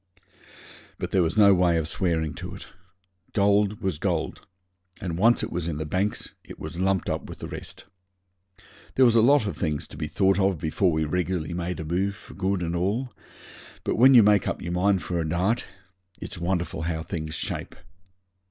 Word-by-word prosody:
But - - -4
there 95 - +3
was 85 +4 0
no 100 -2 +7
way 90 -2 +3
of 80 -2 -1
swearing 80 -3 -1
to - - -7
it. - - -10 0.7
Gold 100 0 +2
was 95 -6 -1
gold, 85 -4 -2 0.5
and 90 -4 -3
once 115 +7 +4
it - - -4
was 85 -1 -2
in 80 -3 -2
the 80 - -3
banks 95 +7 -1
it - - -11
was 85 - -7
lumped 95 -1 +1
up - - -2
with - - -8
the - - -7
rest. - - -8 1.1
There 130 - +6
was 120 -2 +4
a 115 - +6
lot 140 +1 +5
of 100 - -3
things 75 -4 -1
to - - -11
be 75 -1 -3
thought 95 +3 +2
of 95 -2 +2
before 80 +4 +1
we 80 0 0
regularly 90 0 -2
made 90 -1 -3
a 80 - -4
move 95 +5 -1
for - - -14
good 95 -1 -1
and 85 0 -2
all; 105 +9 -1 0.7
but - - -1
when 130 +3 +7
you 115 - +9
make 105 -1 +4
up - - -2
your 85 - -5
mind 95 +2 +2
for 85 -1 -2
a 80 -1 -2
dart, 95 +9 0 0.5
it's 90 - -7
wonderful 85 -2 -2
how 80 -1 -2
things 80 -1 -4
shape. - - -4
90 Hz, 200 wpm, -25 LUFS, 85-100 Hz, 1.1 s, you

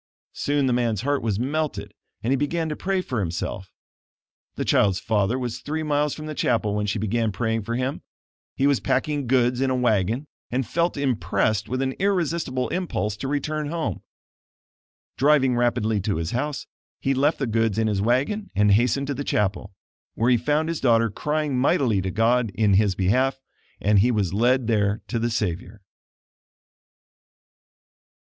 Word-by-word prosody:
Soon 145 -1 0
the 130 - +2
man's 115 -4 0
heart 145 +2 0
was 105 -3 -1
melted 150 +4 -2 0.3
and 120 - 0
he - - +3
began 160 +4 -1
to 150 - -3
pray 190 +2 -1
for 125 -8 -3
himself. 95 +1 -4 0.8
The - - -3
child's 95 -2 +3
father 105 +3 0
was 120 -2 -4
three 155 +5 -3
miles 150 -1 0
from 155 - -8
the 155 - -5
chapel 115 -7 0
when 105 0 -1
she 100 - -1
began 110 +2 0
praying 115 +3 -1
for 115 +3 -4
him. 130 +2 -2 0.5
He 135 - +1
was 140 -2 +3
packing 145 0 -1
goods 125 0 +2
in 135 - +2
a 130 - +1
wagon 115 +1 +1 0.2
and 130 +1 -1
felt 170 +8 0
impressed 110 -5 0
with 130 +1 -1
an 130 - 0
irresistible 170 -9 0
impulse 170 - -2
to 135 - -4
return 150 +1 -2
home. 155 - -3 1.2
Driving 135 -3 +4
rapidly 120 -3 +1
to 100 +1 -1
his 80 +1 -3
house, 145 +3 -2 0.3
he 135 - 0
left 145 +4 +2
the 135 - -1
goods 115 -2 0
in 110 - +2
his 105 -3 0
wagon 135 - 0
and 105 +1 +4
hastened 125 +6 +2
to 140 - -2
the 140 - -4
chapel, 100 -3 -1 0.4
where 120 +3 +2
he - - +6
found 150 +6 0
his 165 -1 -3
daughter 115 -3 +3
crying 150 +4 -1
mightily 125 - +2
to 95 - -3
God 115 +3 +2
in 105 -2 +3
his 100 -1 +3
behalf; 130 +8 +1 0.4
and 105 0 +3
he 115 +6 +4
was 105 -7 0
led 125 +4 +2
there 105 -2 +1
to 120 - -1
the 120 +1 0
Savior. 105 -1 -3
120 Hz, 175 wpm, -24 LUFS, 105-145 Hz, 1.2 s, he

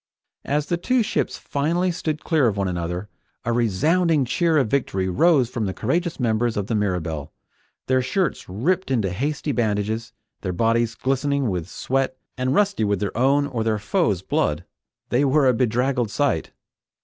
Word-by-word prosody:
As 145 +1 0
the 175 - -1
two 250 +7 +1
ships 215 - -1
finally 170 +6 0
stood 155 -3 -3
clear 155 -6 +3
of 105 -3 -1
one 100 -1 0
another, 90 +2 -3 0.4
a 120 - +1
resounding 150 - +2
cheer 165 +5 +2
of 135 -5 +3
victory 100 -6 0
rose 135 - +4
from 115 -3 -3
the 95 - -4
courageous 170 -2 -1
members 115 -1 +1
of 100 - -1
the 110 - -3
Mirabelle. 90 -8 -2 0.5
Their 130 0 +2
shirts 145 - -1
ripped 160 - 0
into 110 -8 +1
hasty 145 +8 -2
bandages, 110 -1 -1 0.3
their 90 -2 -2
bodies 115 +4 +1
glistening 135 -2 0
with 90 -1 -3
sweat 130 +2 -1 0.2
and 130 +1 0
rusty 205 - +2
with 100 -2 +1
their 100 - -3
own 135 +4 +3
or 125 -6 -2
their 110 -1 +1
foes' 105 - 0
blood, 75 0 0 0.4
they 125 +4 +2
were 140 +1 +3
a 130 - +5
bedraggled 125 0 +1
sight. 135 - 0
125 Hz, 170 wpm, -23 LUFS, 105-145 Hz, 0.5 s, a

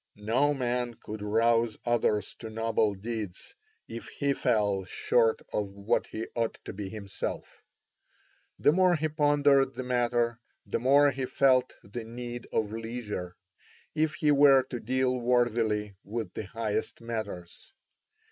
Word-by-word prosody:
No 115 +8 +1
man 125 -2 -1
could 110 -1 -8
rouse 115 +2 +2
others 110 -4 +1
to 110 - -7
noble 110 -2 0
deeds 105 -2 -6 0.3
if 115 - -7
he 140 0 -1
fell 105 -7 +1
short 115 +4 +1
of 100 -2 -2
what 100 +4 0
he 110 - -5
ought 115 -1 -1
to - - -6
be 100 0 -5
himself. 100 -2 -6 1.0
The - - +4
more 180 +1 +4
he 155 0 0
pondered 145 -3 +3
the 130 - -4
matter, 120 -1 +1 0.3
the - - -2
more 140 +4 +5
he 130 -1 -3
felt 130 -2 +3
the 110 +4 -7
need 120 +1 -7
of 105 -2 0
leisure, 110 -5 -5 0.6
if 155 0 0
he 150 -3 +2
were 140 -2 +6
to 120 - -3
deal 130 +2 0
worthily 115 -4 +1
with 110 +3 -5
the 105 - -5
highest 110 0 -2
matters. 110 -7 -6
115 Hz, 140 wpm, -29 LUFS, 105-130 Hz, 1.0 s, were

